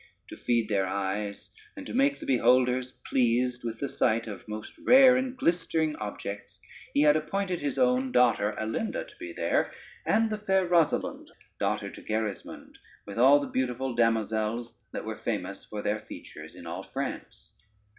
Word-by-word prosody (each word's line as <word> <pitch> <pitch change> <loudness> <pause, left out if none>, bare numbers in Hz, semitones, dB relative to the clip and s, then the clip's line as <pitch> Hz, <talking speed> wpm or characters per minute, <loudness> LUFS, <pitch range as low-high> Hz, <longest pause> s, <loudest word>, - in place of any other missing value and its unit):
To - - -8
feed 115 -2 0
their 95 -3 +1
eyes, 100 +2 -3 0.3
and 285 - -7
to - - -7
make 275 +3 +2
the - - -8
beholders 125 0 +3
pleased 125 0 +1
with 115 -1 -4
the 140 - -1
sight 115 -3 +1
of 100 -4 -8
most 110 0 -7
rare 260 0 +7
and 260 0 -1
glistering 165 -4 +1
objects, 105 -1 -6 0.4
he 145 - +5
had 150 0 +6
appointed 180 +3 -1
his 145 -1 -3
own 255 +1 +2
daughter 110 - +3
Alinda 220 - -2
to - - -17
be 340 0 -6
there, 340 - 0 0.3
and 225 0 +2
the 215 - -2
fair 190 -3 +1
Rosalynde, 170 -3 +1 0.3
daughter 105 -1 0
unto 100 - -9
Gerismond, 110 -2 -4 0.3
with 100 +2 -6
all 135 +4 +7
the 145 - -3
beautiful 130 0 -1
damosels 115 0 0 0.2
that - - -5
were - - -5
famous - - -4
for 105 -1 -6
their 105 +1 0
features - - -11
in - - -11
all - - -5
France. - - -7
125 Hz, 165 wpm, -28 LUFS, 110-180 Hz, 0.4 s, rare